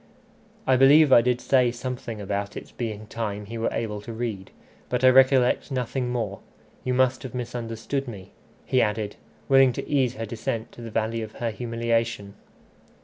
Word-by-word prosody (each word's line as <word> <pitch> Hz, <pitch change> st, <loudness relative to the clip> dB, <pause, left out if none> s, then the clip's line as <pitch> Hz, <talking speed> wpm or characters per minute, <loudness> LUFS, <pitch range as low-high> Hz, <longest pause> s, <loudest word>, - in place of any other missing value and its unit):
"I 130 Hz, -1 st, +4 dB
believe 140 Hz, +2 st, +7 dB
I 120 Hz, -, +8 dB
did 125 Hz, 0 st, +1 dB
say 125 Hz, -1 st, +3 dB
something 120 Hz, -2 st, -5 dB
about 100 Hz, 0 st, -3 dB
its -, -, -9 dB
being 110 Hz, -3 st, -5 dB
time 105 Hz, -2 st, -4 dB
he 115 Hz, +3 st, -6 dB
were 115 Hz, -, +1 dB
able 105 Hz, -2 st, -3 dB
to 110 Hz, -, -8 dB
read, 110 Hz, -5 st, -4 dB, 0.4 s
but 125 Hz, 0 st, -1 dB
I 130 Hz, -, +8 dB
recollect 130 Hz, 0 st, +4 dB
nothing 125 Hz, 0 st, -2 dB
more. 110 Hz, -5 st, -3 dB, 0.4 s
You 125 Hz, -1 st, 0 dB
must 130 Hz, 0 st, +2 dB
have 130 Hz, -1 st, -8 dB
misunderstood 120 Hz, +2 st, -4 dB
me," 100 Hz, -6 st, -9 dB, 0.3 s
he 130 Hz, -, +2 dB
added, 105 Hz, -1 st, -1 dB, 0.3 s
willing 135 Hz, -2 st, +6 dB
to -, -, -5 dB
ease 130 Hz, -4 st, +1 dB
her 115 Hz, -, -4 dB
descent 110 Hz, 0 st, -4 dB
to -, -, -12 dB
the 115 Hz, -, -6 dB
valley 115 Hz, +1 st, -1 dB
of 110 Hz, -1 st, -7 dB
her 115 Hz, -1 st, -3 dB
humiliation. 115 Hz, -2 st, -2 dB
115 Hz, 175 wpm, -25 LUFS, 110-125 Hz, 0.4 s, I